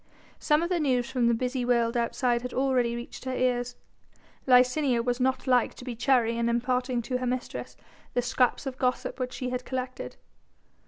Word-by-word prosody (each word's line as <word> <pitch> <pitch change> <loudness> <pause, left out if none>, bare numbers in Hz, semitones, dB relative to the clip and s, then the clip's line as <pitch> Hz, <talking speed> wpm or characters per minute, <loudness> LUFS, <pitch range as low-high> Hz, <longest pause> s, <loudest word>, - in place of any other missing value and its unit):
Some 300 +2 +2
of 340 - -2
the 360 -2 +1
news 260 -4 +1
from 250 -3 +2
the 235 - +4
busy 250 +2 -2
world 235 -1 +2
outside 240 +1 +1
had 250 0 -6
already 255 -3 +1
reached 240 +2 -8
her 260 0 -2
ears. 245 -1 0 0.7
Licinia 250 0 +4
was 245 0 0
not 260 +1 0
like 250 -3 +2
to 250 - -11
be 245 -2 -4
chary 235 -1 +2
in 235 0 +1
imparting 250 +1 0
to 250 +2 -2
her 255 - -2
mistress 250 0 -4 0.4
the 245 - +2
scraps 250 +2 +1
of 260 -1 -5
gossip 250 +1 -1
which 255 0 -3
she 250 -1 -4
had 250 0 -3
collected. 255 0 -5
250 Hz, 190 wpm, -27 LUFS, 240-260 Hz, 0.7 s, the